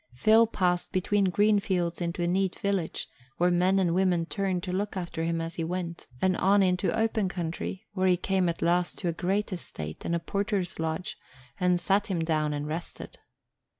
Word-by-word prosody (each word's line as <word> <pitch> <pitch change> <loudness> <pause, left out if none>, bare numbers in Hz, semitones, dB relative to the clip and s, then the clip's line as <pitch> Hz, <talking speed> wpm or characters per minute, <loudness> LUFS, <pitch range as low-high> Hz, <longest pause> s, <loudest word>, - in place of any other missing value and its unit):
Phil 220 - +5
passed 180 -5 0
between 200 +2 +1
green 205 +3 +3
fields 180 -3 -1
into 170 +1 -2
a - - +1
neat 190 +1 0
village, 195 -5 -1 0.3
where 175 +1 +3
men 180 +2 +3
and 180 -3 +2
women 180 -2 +2
turned 185 -1 -2
to 180 - -3
look 200 +2 -2
after 170 -2 -3
him 165 0 0
as 165 +1 -4
he 165 - -1
went, 170 0 -4 0.2
and 185 -1 +3
on 200 +1 +4
into 180 0 +1
open 220 -3 +1
country, 180 +3 -4
where 190 -1 +1
he 180 -1 +4
came 185 -1 +1
at 170 - -3
last 175 +1 +1
to 180 - -3
a 170 - +1
great 195 +4 -1
estate 80 - -7
and 170 - 0
a - - 0
porter's 195 +1 -2
lodge 160 +2 -3 0.4
and 180 -1 +3
sat 195 +3 +1
him 190 - -1
down 155 -2 0
and 145 0 -3
rested. 160 +3 -6
180 Hz, 195 wpm, -28 LUFS, 170-195 Hz, 0.4 s, Phil